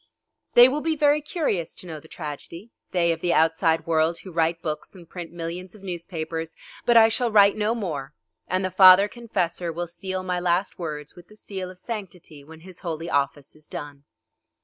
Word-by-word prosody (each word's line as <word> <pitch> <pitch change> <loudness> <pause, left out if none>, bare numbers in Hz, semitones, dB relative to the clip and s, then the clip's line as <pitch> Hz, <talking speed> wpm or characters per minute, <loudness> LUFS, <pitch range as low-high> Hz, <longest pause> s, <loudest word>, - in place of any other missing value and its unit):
They 240 +1 +10
will 285 +3 -1
be 320 0 0
very 295 0 +3
curious 285 - -2
to - - -12
know 160 -3 -7
the 160 - -17
tragedy 165 +7 -8 0.2
they 170 -2 +2
of 165 0 -3
the 175 -1 +1
outside 160 0 +2
world 165 0 +2
who 190 - -11
write 165 0 +1
books 155 +3 -4
and 175 -3 -13
print 175 -1 -8
millions 175 +3 -6
of 205 - -16
newspapers, 165 -3 -5 0.3
but 240 -1 +6
I 225 -1 +8
shall 235 +2 0
write 200 -1 +6
no 215 +2 0
more, 150 - -4 0.3
and 185 +1 0
the 185 - -2
father 185 +1 +8
confessor 180 -7 -3
will 175 +2 -3
seal 185 +2 -5
my 180 -1 -1
last 180 +2 0
words 150 -3 -5
with 175 -1 -15
the 215 - -17
seal 190 -3 -6
of 185 - -12
sanctity 180 -9 -8
when 160 +2 -14
his 185 0 -10
holy 165 -1 -4
office 140 0 -1
is 155 0 -16
done. 145 -1 -8
175 Hz, 195 wpm, -24 LUFS, 160-195 Hz, 0.3 s, They